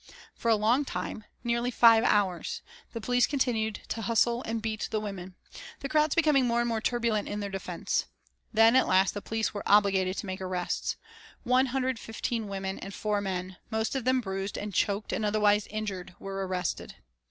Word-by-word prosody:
For 230 - -2
a 225 - +6
long 225 +7 +3
time, 220 -5 -5 0.2
nearly 235 0 0
five 230 -2 +6
hours, 195 -6 +1 0.3
the 230 - -5
police 245 +2 +2
continued 230 -6 0
to 225 - -3
hustle 235 +2 +2
and 225 0 -1
beat 220 -1 -3
the 215 - -1
women, 190 -3 -6 0.5
the 275 - -4
crowds 305 -1 +2
becoming 300 -6 +4
more 235 0 +2
and 240 - +1
more 225 -2 -1
turbulent 230 -3 0
in 205 - -3
their 200 -1 -4
defence. 195 0 -2 0.4
Then, 225 +2 +5
at 260 - +5
last 190 +1 +3
the 205 - -5
police 225 +1 -2
were 205 - -4
obliged 195 -2 +4
to - - -3
make 190 0 -5
arrests. 185 -1 -2 0.5
One 255 +1 +3
hundred 260 0 0
and 255 -3 -2
fifteen 225 0 -3
women 195 -1 -4
and 195 +1 -7
four 210 -1 -1
men, 185 -1 -4
most 220 -1 -1
of 265 - -1
them 255 0 +3
bruised 195 -1 -4
and 205 -1 -5
choked 200 +3 0
and 220 - -1
otherwise 210 0 +3
injured, 200 -5 -5
were 195 -1 -4
arrested. 180 -2 -3
215 Hz, 190 wpm, -29 LUFS, 195-235 Hz, 0.5 s, a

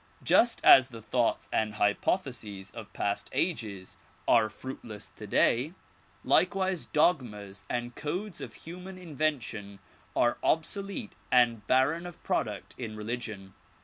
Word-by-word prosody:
Just 235 0 +4
as 130 -1 +9
the 115 - -9
thoughts 120 +2 0
and 110 -1 0
hypotheses 105 - -1
of 115 -3 -9
past 100 0 -2
ages 110 - -2 0.3
are 110 -2 +5
fruitless 110 -4 -8
today, 120 - +1 0.5
likewise 190 -2 +2
dogmas 105 - 0
and 120 0 -2
codes 180 +5 -4
of - - -7
human 180 +3 -8
invention 140 - -3 0.4
are 120 0 +2
obsolete 200 +7 -1 0.2
and 120 -4 +3
barren 145 +7 +3
of 175 - -12
product - - -2
in 110 -3 -5
religion. 105 -3 -5
120 Hz, 115 wpm, -29 LUFS, 105-160 Hz, 0.5 s, as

